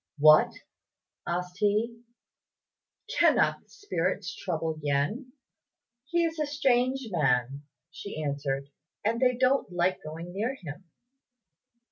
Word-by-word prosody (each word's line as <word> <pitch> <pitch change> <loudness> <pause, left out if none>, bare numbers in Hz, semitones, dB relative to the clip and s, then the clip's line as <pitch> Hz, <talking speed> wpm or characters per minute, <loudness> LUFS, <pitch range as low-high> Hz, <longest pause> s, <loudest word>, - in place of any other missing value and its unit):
"What!" 155 +1 +7 0.8
asked 180 +1 -3
he, 215 +3 +1 1.2
"cannot - - +4
the - - -33
spirits 410 0 -2
trouble 160 -3 -3
Yen?" 150 - -1 0.7
"He 340 +3 +1
is 325 -1 -3
a 300 - 0
strange 265 -3 +1
man," 135 -3 +1 0.3
she 200 -6 -7
answered, 140 -2 -2 0.4
"and 230 +2 +1
they 250 -1 +4
don't 255 -4 +2
like 180 +1 +1
going 165 +3 -8
near 225 +7 -1
him." 180 - -9
185 Hz, 110 wpm, -28 LUFS, 155-255 Hz, 1.2 s, What